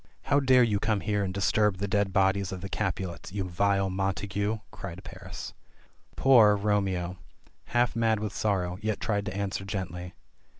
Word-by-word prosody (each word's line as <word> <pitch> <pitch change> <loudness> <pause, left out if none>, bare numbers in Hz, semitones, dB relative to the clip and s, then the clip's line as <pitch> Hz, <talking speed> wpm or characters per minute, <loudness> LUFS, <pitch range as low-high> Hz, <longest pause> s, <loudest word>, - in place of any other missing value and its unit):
"How 145 - +3
dare 130 -2 +5
you 105 -4 +1
come 105 -1 0
here 105 -1 0
and 95 - -2
disturb 100 +1 +2
the 100 +2 -2
dead 100 -1 +1
bodies 95 0 +2
of 95 -1 -6
the 95 - -6
Capulets, 90 -1 -3
you 100 0 -2
vile 95 +2 +1
Montagu 100 +3 -1
!" - - -36
cried 95 0 -8
Paris. - - -8 0.6
Poor, 115 -6 +6
Romeo, 95 -3 -1 0.5
half 120 0 +1
mad 115 -2 +2
with 105 -2 -4
sorrow, 95 -3 -1
yet 110 -1 -1
tried 100 -2 -1
to 95 - -4
answer 100 -1 -2
gently. 90 -3 -5
100 Hz, 170 wpm, -28 LUFS, 95-105 Hz, 0.6 s, Poor